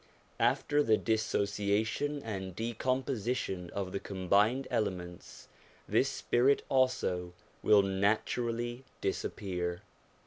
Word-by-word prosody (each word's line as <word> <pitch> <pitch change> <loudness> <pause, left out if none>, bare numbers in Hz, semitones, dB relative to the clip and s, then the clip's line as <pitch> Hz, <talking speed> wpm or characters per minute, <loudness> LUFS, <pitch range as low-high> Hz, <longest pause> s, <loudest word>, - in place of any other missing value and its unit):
After 145 +1 +2
the 110 -6 +4
dissociation 110 +5 0
and 95 -5 -5
decomposition 120 -4 -2
of 95 -1 -4
the 100 - -2
com 95 -2 -6
bined 110 +7 +4
elements, 90 -7 -3 0.4
this - - +3
spirit 130 +4 +2
also 95 -10 +1 0.3
will 105 -2 +6
naturally 115 +5 0 0.2
disappear. 90 -3 -3
105 Hz, 95 wpm, -32 LUFS, 95-120 Hz, 0.4 s, will